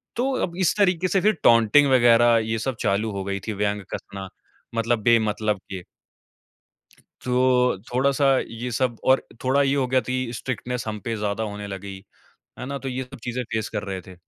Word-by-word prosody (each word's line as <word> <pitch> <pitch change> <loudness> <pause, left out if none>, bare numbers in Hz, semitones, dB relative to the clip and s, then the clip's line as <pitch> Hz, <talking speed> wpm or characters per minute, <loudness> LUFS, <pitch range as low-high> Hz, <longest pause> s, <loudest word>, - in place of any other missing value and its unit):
तो 260 +3 0 0.2
अब 175 0 -11
इस - - +2
तरीके 185 -3 +2
से 190 0 +1
फिर 215 +1 +2
टॉटिंग 115 +5 +5
वगैरह 120 -2 +5
ये 110 0 -2
सब 130 +2 -2
चालू 105 +2 0
हो 100 -1 -4
गई 100 0 -3
थी, 110 - -1
व्यंग 105 0 -1
कसना 95 -1 -7 0.5
मतलब 115 0 0
बेमतलब 110 -3 +2
के। 95 -2 -5 1.4
तो 125 -2 +2 0.2
थोड़ा-सा 140 +2 +2
ये 120 +2 -5
सब 120 -1 -1
और 130 0 +3 0.2
थोड़ा 135 +2 +3
ये 140 0 +2
हो 135 -2 +1
गया 130 +1 +3
कि 130 -2 -2
स्ट्रिक्टनेस 125 -1 -4
हम 105 -1 -4
पे 115 -1 -1
ज़्यादा 105 +1 -2
होने 105 -1 -5
लगी। 95 0 -7 0.6
है 125 - -6
ना? 140 +1 -4
तो 135 - -6
ये 130 0 -3
सब 125 - -12
चीज़ें 125 +1 -2
फेस 110 -2 -1
कर - - -4
रहे 95 -2 -4
थे। 95 0 -13
120 Hz, 190 wpm, -24 LUFS, 105-130 Hz, 1.4 s, टॉटिंग